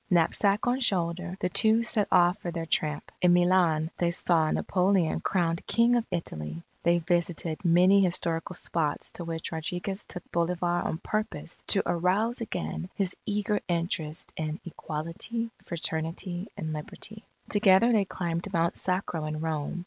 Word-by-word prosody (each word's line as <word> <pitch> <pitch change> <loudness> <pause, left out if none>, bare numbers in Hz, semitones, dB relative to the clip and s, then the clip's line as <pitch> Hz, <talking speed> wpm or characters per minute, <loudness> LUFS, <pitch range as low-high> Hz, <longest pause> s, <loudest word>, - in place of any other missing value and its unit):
Knapsack 195 +4 +3
on 250 +1 +1
shoulder, 180 -5 0
the - - +1
two 220 +5 +5
set 220 -3 +3
off 175 +3 +4
for 175 - -4
their 165 -1 -4
tramp. 150 -2 -1
In 180 -1 +5
Milan, 175 -3 +3
they 175 - +2
saw 170 -2 +2
Napoleon 185 -2 +1
crowned 170 -3 0
King 235 +1 +4
of 235 -1 0
Italy. 80 - -4 0.2
They 170 0 +3
visited 170 -1 -1
many 180 +3 +5
historical 170 -1 -1
spots 155 -4 -2
to 175 - -7
which 165 -1 -4
Rodriguez 175 +5 -3
took 180 - -7
Bolivar 175 0 0
on - - -2
purpose 180 -5 -4
to 195 - +2
arouse 195 +8 +1
again 180 -4 -4
his 190 -2 -1
eager 210 0 0
interest 165 -3 -2
in 155 0 -3
Equality, 170 +9 -4 0.2
Fraternity, 170 +3 -3
and 155 -1 -3
Liberty. 210 +8 -7 0.2
Together 205 +2 +5
they 205 -3 +3
climbed 175 0 -3
Mount 170 -1 0
Sacro 180 -4 -1
in 155 0 -3
Rome. 160 +1 -2
175 Hz, 150 wpm, -28 LUFS, 165-195 Hz, 0.2 s, two